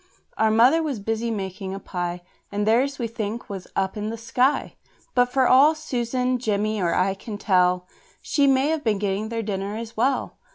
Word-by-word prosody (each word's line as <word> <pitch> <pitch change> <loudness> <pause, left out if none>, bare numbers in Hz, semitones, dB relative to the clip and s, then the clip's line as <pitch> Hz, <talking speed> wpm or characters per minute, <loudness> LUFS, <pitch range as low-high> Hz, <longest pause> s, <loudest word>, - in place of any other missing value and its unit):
Our 220 - +2
mother 245 +9 +5
was 290 -8 -2
busy 225 +3 -2
making 190 -2 -4
a - - -6
pie, 175 -2 -4 0.3
And 205 0 -1
theirs, 260 +6 +2
we 235 - -2
think, 225 0 -5
was 190 -2 -6
up 190 0 0
in 210 0 -3
the 230 - -5
sky; 250 +4 +1 0.4
But 245 0 +3
for 260 -1 +3
all 285 +5 +6
Susan, 255 -3 -1
Jemmy, 215 -2 -1
or 170 -2 +1
I 190 +1 +2
can 205 +2 -7
tell, 180 -3 +2 0.3
She 285 -2 +1
may 270 +2 +3
have 320 -2 -1
been 220 -3 +1
getting 205 +2 -2
their 230 -1 -3
dinner 200 0 -3
as 230 0 -7
well. 260 +5 0
220 Hz, 195 wpm, -24 LUFS, 200-250 Hz, 0.4 s, all